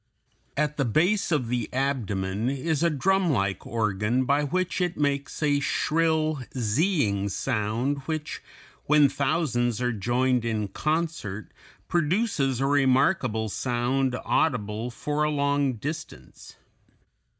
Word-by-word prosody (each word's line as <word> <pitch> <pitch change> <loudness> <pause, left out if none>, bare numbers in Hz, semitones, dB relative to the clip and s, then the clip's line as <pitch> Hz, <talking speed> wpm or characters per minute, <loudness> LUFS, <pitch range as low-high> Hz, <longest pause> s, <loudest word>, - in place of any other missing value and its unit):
At 150 +1 0
the 140 - +2
base 175 - +1
of 145 -7 +1
the 120 -1 -2
abdomen 110 -6 -1
is 140 +3 -1
a 170 - +4
drumlike 150 - +1
organ 110 +3 0
by 140 +3 +2
which 185 +5 -1
it 180 -1 -1
makes 145 +1 -1
a 145 -1 +3
shrill 155 +2 +1 0.2
"zeeing" 110 - +1
sound 120 +5 -1
which, 155 -2 -4 0.4
when 150 -1 +5
thousands 120 -6 0
are 125 0 0
joined 120 +3 +1
in 110 -3 -2
concert, 155 - -2 0.4
produces 170 - +1
a 135 - +1
remarkable 135 - +2
sound 125 +3 0
audible 115 -5 0
for 150 +5 -3
a 150 - +2
long 140 -2 +1
distance. 145 +8 -8
135 Hz, 115 wpm, -26 LUFS, 115-155 Hz, 0.4 s, when